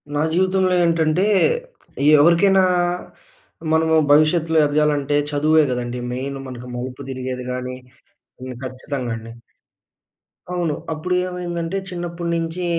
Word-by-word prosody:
నా -, -, +1 dB
జీవితంలో 185 Hz, 0 st, +2 dB
ఏంటంటే. 165 Hz, +1 st, +2 dB, 1.0 s
ఎవరికైనా 185 Hz, +5 st, +5 dB, 1.1 s
మనము 160 Hz, 0 st, +3 dB, 0.2 s
భవిష్యత్తులో 160 Hz, +2 st, +3 dB
ఎదగాలంటే 145 Hz, -1 st, +1 dB, 0.2 s
చదువే 155 Hz, +2 st, +3 dB
గదండీ 125 Hz, 0 st, -3 dB
మెయిన్. 135 Hz, +2 st, -4 dB
మనకు 125 Hz, -1 st, -8 dB
మలుపు 130 Hz, +2 st, -6 dB
తిరిగేది 130 Hz, -1 st, -5 dB
గాని 125 Hz, 0 st, -4 dB, 0.7 s
హ్మ్. 130 Hz, -1 st, -7 dB
ఖచ్చితంగా 130 Hz, -1 st, -5 dB
అండి. 115 Hz, +1 st, -10 dB, 1.2 s
అవును. 170 Hz, -4 st, -1 dB, 0.2 s
అప్పుడు 160 Hz, +4 st, -2 dB
ఏమైందంటే 175 Hz, 0 st, -4 dB
చిన్నప్పుడు 175 Hz, -1 st, -5 dB
నించి 165 Hz, +2 st, -2 dB
155 Hz, 105 wpm, -21 LUFS, 130-170 Hz, 1.2 s, ఎవరికైనా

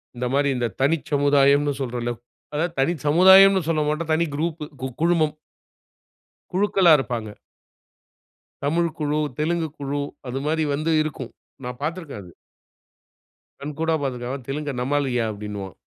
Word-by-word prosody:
இந்த 125 Hz, +1 st, -3 dB
மாரி 140 Hz, 0 st, +2 dB
இந்த 120 Hz, -, 0 dB
தனிச் 145 Hz, 0 st, +1 dB
சமுதாயம்ன்னு 145 Hz, 0 st, +4 dB
சொல்றோம்ல. 120 Hz, -1 st, -2 dB, 0.4 s
அதாவது 165 Hz, +3 st, -1 dB
தனி 150 Hz, +6 st, +2 dB
சமுதாயம்னு 190 Hz, +4 st, +7 dB
சொல்லமாட்டோம். 155 Hz, +1 st, 0 dB
தனி 165 Hz, +2 st, +2 dB
குரூப்பு 160 Hz, 0 st, -2 dB, 0.2 s
கு 130 Hz, -, -2 dB
குழுமம். 165 Hz, -3 st, +2 dB, 1.2 s
குழுக்களா 190 Hz, -2 st, +4 dB
இருப்பாங்க. 115 Hz, -5 st, -4 dB, 1.3 s
தமிழ் 165 Hz, +4 st, +1 dB
குழு, 150 Hz, 0 st, -1 dB, 0.2 s
தெலுங்கு 160 Hz, +1 st, 0 dB
குழு 145 Hz, 0 st, -3 dB, 0.3 s
அது 130 Hz, +2 st, -3 dB
மாரி 160 Hz, 0 st, +1 dB
வந்து 155 Hz, +3 st, 0 dB
இருக்கும். 135 Hz, -5 st, -6 dB, 0.3 s
நான் 125 Hz, 0 st, -6 dB
பாத்துருக்கேன் 160 Hz, -, -5 dB
அது. 90 Hz, -, -14 dB, 1.3 s
கண்கூடா 160 Hz, +3 st, -2 dB
பாத்துருக்கேன். 125 Hz, -2 st, -3 dB
"அவன் 130 Hz, -4 st, -7 dB
தெலுங்கன் 140 Hz, -3 st, -3 dB
நம்மாளுயா" 130 Hz, -3 st, 0 dB
அப்டின்னுவான். 100 Hz, -2 st, -7 dB
145 Hz, 125 wpm, -23 LUFS, 130-160 Hz, 1.3 s, சமுதாயம்னு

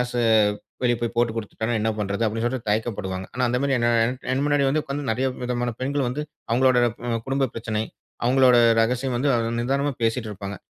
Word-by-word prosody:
ஏதாச்சு 125 Hz, 0 st, -1 dB, 0.6 s
வெளி 120 Hz, -1 st, +3 dB
போய் 120 Hz, 0 st, -2 dB
போட்டுக் 115 Hz, -1 st, +1 dB
குடுத்துட்டானா 110 Hz, +1 st, -3 dB
என்ன 110 Hz, +1 st, +1 dB
பண்றது? 100 Hz, +1 st, -2 dB
அப்டின்னு 115 Hz, +2 st, -2 dB
சொல்லிட்டு 120 Hz, -3 st, -2 dB
தய்க்க 110 Hz, +3 st, +1 dB
படுவாங்க. 95 Hz, 0 st, -4 dB
ஆனா, 125 Hz, -, -2 dB
அந்த 125 Hz, -, 0 dB
மாரி 140 Hz, -1 st, +1 dB
என் 120 Hz, -, +1 dB, 0.2 s
என் 125 Hz, +2 st, -1 dB, 0.2 s
என் 135 Hz, +2 st, 0 dB
முன்னாடி 145 Hz, -1 st, +2 dB
வந்து 155 Hz, +3 st, +1 dB
உட்கார்ந்து 145 Hz, +1 st, -4 dB
நிறைய 130 Hz, +4 st, 0 dB, 0.2 s
விதமான 120 Hz, 0 st, -1 dB
பெண்கள் 140 Hz, 0 st, 0 dB
வந்து 145 Hz, +5 st, -3 dB, 0.3 s
அவங்களுடைய 125 Hz, 0 st, +4 dB, 0.2 s
ம் 115 Hz, -1 st, 0 dB
குடும்ப 135 Hz, -1 st, 0 dB
பிரச்சனை, 110 Hz, -1 st, -2 dB, 0.4 s
அவங்களுடைய 125 Hz, -1 st, +5 dB, 0.2 s
ரகசியம் 125 Hz, +2 st, 0 dB
வந்து 140 Hz, +4 st, +1 dB, 0.3 s
நிதானமா 140 Hz, +4 st, 0 dB
பேசிட்டிருப்பாங்க. 105 Hz, -4 st, -2 dB
120 Hz, 185 wpm, -24 LUFS, 115-130 Hz, 0.6 s, அவங்களுடைய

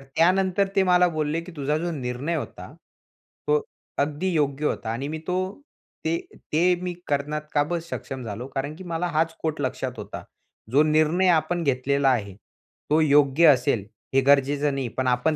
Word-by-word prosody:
त्यानंतर 190 Hz, +3 st, +3 dB
ते 195 Hz, -, +4 dB
मला 180 Hz, -1 st, +5 dB
बोलले 155 Hz, +1 st, -1 dB
की 175 Hz, +2 st, -10 dB
तुझा 150 Hz, +1 st, 0 dB
जो 170 Hz, +2 st, -2 dB
निर्णय 135 Hz, +3 st, -3 dB
होता -, -, -6 dB, 0.8 s
तो 455 Hz, 0 st, +3 dB, 0.4 s
अगदी 150 Hz, +6 st, 0 dB
योग्य 145 Hz, -2 st, 0 dB
होता. 110 Hz, -, -1 dB
आणि 125 Hz, +5 st, -3 dB
मी 155 Hz, +1 st, -4 dB
तो, 185 Hz, +6 st, -2 dB, 0.4 s
ते 165 Hz, +1 st, +1 dB, 0.4 s
ते 180 Hz, +3 st, +4 dB
मी 180 Hz, -1 st, -3 dB
करण्यास 150 Hz, +1 st, -2 dB
का 145 Hz, -1 st, +4 dB
बर 170 Hz, +3 st, -2 dB
सक्षम 130 Hz, -1 st, -5 dB
झालो 115 Hz, +3 st, -6 dB
कारण 140 Hz, +3 st, -2 dB
की 185 Hz, -, -10 dB
मला 170 Hz, 0 st, -2 dB
हाच 165 Hz, 0 st, +1 dB
कोट 160 Hz, -2 st, -2 dB
लक्षात -, -, -3 dB
होता. -, -, -7 dB, 0.5 s
जो 145 Hz, +4 st, +5 dB
निर्णय 155 Hz, +4 st, +3 dB
आपण 175 Hz, +1 st, -3 dB
घेतलेला 140 Hz, 0 st, +2 dB
आहे 100 Hz, -7 st, -1 dB, 0.5 s
तो 155 Hz, +2 st, +4 dB
योग्य 145 Hz, +1 st, +4 dB
असेल 120 Hz, -5 st, 0 dB, 0.3 s
हे 135 Hz, -, +5 dB
गरजेचं 140 Hz, +1 st, +3 dB
नाही, 135 Hz, -2 st, -2 dB
पण 130 Hz, +2 st, -2 dB
आपण 125 Hz, +5 st, +2 dB
150 Hz, 170 wpm, -25 LUFS, 135-170 Hz, 0.8 s, मला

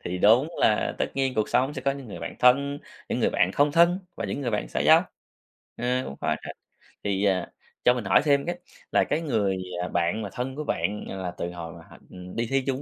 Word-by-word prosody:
Thì 90 Hz, +1 st, -3 dB
đúng 115 Hz, -, +5 dB
là 105 Hz, -, +2 dB
tất -, -, +1 dB
nhiên 135 Hz, -1 st, 0 dB
cuộc 110 Hz, -, 0 dB
sống 135 Hz, +4 st, +1 dB
sẽ 130 Hz, -, -5 dB
có 140 Hz, -, +2 dB
những 135 Hz, -4 st, -6 dB
người 85 Hz, -, -7 dB
bạn 85 Hz, -, -5 dB
thân, 140 Hz, +3 st, +4 dB, 0.3 s
những -, -, -1 dB
người -, -, +3 dB
bạn 95 Hz, -, +2 dB
không 145 Hz, 0 st, +3 dB
thân 170 Hz, +3 st, +5 dB, 0.2 s
và 115 Hz, -, -4 dB
những 105 Hz, +8 st, -3 dB
người 125 Hz, -, -1 dB
bạn 105 Hz, -, -2 dB
xã -, -, -3 dB
giao, -, -, +6 dB, 0.7 s
ờ, 120 Hz, -, -5 dB, 0.2 s
cũng 70 Hz, -, -7 dB
khó -, -, +1 dB
tránh. -, -, -8 dB, 0.5 s
Thì, 100 Hz, 0 st, 0 dB
ờ, 95 Hz, -3 st, +2 dB, 0.4 s
cho 125 Hz, -, +7 dB
mình 120 Hz, -5 st, -4 dB
hỏi 95 Hz, -, +5 dB
thêm 140 Hz, -2 st, +3 dB
cái, 175 Hz, 0 st, -3 dB, 0.3 s
là -, -, +4 dB
cái 160 Hz, -, -1 dB
người, 105 Hz, -, 0 dB, 0.2 s
à, 90 Hz, -, -2 dB
bạn 85 Hz, +5 st, 0 dB
mà 100 Hz, -, -4 dB
thân 130 Hz, +2 st, -4 dB
của 150 Hz, -, -4 dB
bạn 105 Hz, -7 st, -2 dB
là 95 Hz, -2 st, -4 dB
từ 85 Hz, -, -3 dB
hồi 85 Hz, -2 st, -7 dB
mà 85 Hz, -, -12 dB
hả, -, -, -13 dB
ừm, 90 Hz, 0 st, -10 dB
đi 115 Hz, 0 st, -1 dB
thi 135 Hz, 0 st, +2 dB
chung 135 Hz, +1 st, -1 dB
115 Hz, 250 wpm, -26 LUFS, 95-140 Hz, 0.7 s, cho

